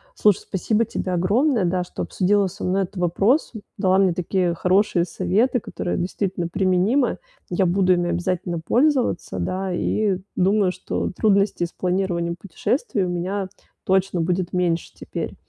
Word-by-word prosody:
Слушай, 210 Hz, -, +3 dB
спасибо 215 Hz, +4 st, 0 dB
тебе 185 Hz, -3 st, -3 dB
огромное, 210 Hz, -, +2 dB
да, 180 Hz, +1 st, 0 dB
что 180 Hz, -, -6 dB
обсудила 200 Hz, +1 st, +2 dB
со 180 Hz, -, -8 dB
мной 190 Hz, +2 st, +1 dB
этот 190 Hz, +2 st, -9 dB
вопрос, 195 Hz, -, +2 dB, 0.3 s
дала 190 Hz, 0 st, +3 dB
мне 190 Hz, -2 st, +3 dB
такие 180 Hz, 0 st, 0 dB
хорошие 185 Hz, +1 st, +2 dB
советы, 230 Hz, +8 st, +1 dB
которые 175 Hz, -, -4 dB
действительно 180 Hz, 0 st, -2 dB
применимы, 190 Hz, +9 st, +1 dB, 0.3 s
я 185 Hz, +1 st, +1 dB
буду 185 Hz, +1 st, +3 dB
ими 175 Hz, -1 st, 0 dB
обязательно 175 Hz, 0 st, -2 dB
пользоваться, 240 Hz, -, +1 dB
да, 185 Hz, -, -2 dB
и 200 Hz, +1 st, 0 dB, 0.2 s
думаю, 195 Hz, 0 st, +3 dB
что 185 Hz, -, -3 dB
трудностей 200 Hz, -4 st, +2 dB
с 170 Hz, -, -9 dB
планированием 180 Hz, -2 st, -1 dB
путешествий 200 Hz, -, -2 dB
у -, -, -2 dB
меня 185 Hz, +2 st, -2 dB, 0.4 s
точно 190 Hz, -2 st, +1 dB
будет 180 Hz, +1 st, -1 dB
меньше 175 Hz, -2 st, 0 dB
теперь. -, -, -5 dB
185 Hz, 145 wpm, -22 LUFS, 175-200 Hz, 0.4 s, Слушай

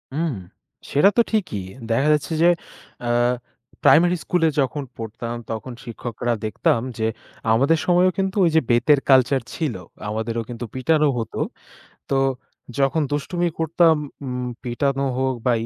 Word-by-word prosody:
হুম। 160 Hz, -2 st, 0 dB, 0.6 s
সেটা 150 Hz, +8 st, +5 dB
তো -, -, +8 dB
ঠিকই। 180 Hz, -, -1 dB, 0.3 s
দেখা 135 Hz, +6 st, +2 dB
যাচ্ছে 150 Hz, +2 st, -1 dB
যে 170 Hz, -, +6 dB, 0.6 s
আ -, -, 0 dB, 0.7 s
প্রাইমারি 175 Hz, +2 st, +6 dB
স্কুলে 170 Hz, -2 st, +2 dB
যখন 140 Hz, +2 st, 0 dB
পড়তাম, 115 Hz, +1 st, -5 dB
তখন 115 Hz, +3 st, -5 dB
শিক্ষকরা 120 Hz, 0 st, -3 dB
দেখতাম 115 Hz, +1 st, +1 dB, 0.2 s
যে 110 Hz, -, 0 dB, 0.5 s
আমাদের 140 Hz, +8 st, +3 dB
সময়েও 180 Hz, +1 st, +4 dB
কিন্তু 195 Hz, 0 st, -1 dB
ওইযে 160 Hz, -1 st, +3 dB
বেতের 130 Hz, +5 st, +4 dB
কালচার 130 Hz, 0 st, +5 dB
ছিল। 155 Hz, -8 st, -2 dB, 0.3 s
আমাদেরও 115 Hz, +1 st, -2 dB
কিন্তু 120 Hz, 0 st, -5 dB
পিটানো 150 Hz, +4 st, +2 dB
হতো। 115 Hz, -, -4 dB, 0.7 s
তো -, -, +2 dB, 0.6 s
যখন 140 Hz, +3 st, +2 dB
দুষ্টুমি 175 Hz, +4 st, -1 dB
করতাম 165 Hz, 0 st, +4 dB, 0.3 s
উম 125 Hz, -1 st, -3 dB, 0.2 s
পিটানো 135 Hz, +3 st, 0 dB, 0.2 s
হোক 130 Hz, 0 st, +1 dB
বা, 125 Hz, -, +4 dB
135 Hz, 135 wpm, -22 LUFS, 120-160 Hz, 0.7 s, তো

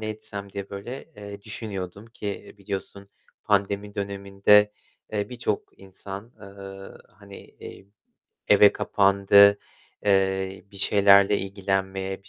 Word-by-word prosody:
ne 110 Hz, -, -4 dB
etsem 100 Hz, -2 st, -6 dB
diye 100 Hz, -1 st, -7 dB
böyle, 120 Hz, +7 st, -7 dB
eee, 100 Hz, -1 st, -10 dB
düşünüyordum 100 Hz, -2 st, -7 dB
ki 105 Hz, -3 st, -7 dB
biliyorsun 100 Hz, 0 st, -7 dB, 0.4 s
pandemi 100 Hz, 0 st, 0 dB
döneminde, 100 Hz, +1 st, +2 dB, 0.4 s
eee, 105 Hz, -1 st, -2 dB
birçok 120 Hz, -4 st, -4 dB
insan, 95 Hz, +4 st, -10 dB
eee, 100 Hz, -1 st, -11 dB, 0.2 s
hani, 100 Hz, 0 st, -14 dB
eee, 95 Hz, -, -13 dB, 0.6 s
eve 105 Hz, 0 st, +7 dB
kapandı. 100 Hz, 0 st, +4 dB, 0.5 s
Eee, 95 Hz, -1 st, 0 dB
bir -, -, -12 dB
şeylerle 100 Hz, 0 st, +5 dB
ilgilenmeye, 95 Hz, 0 st, -3 dB
bir 95 Hz, -, -18 dB
100 Hz, 110 wpm, -25 LUFS, 95-105 Hz, 0.6 s, eve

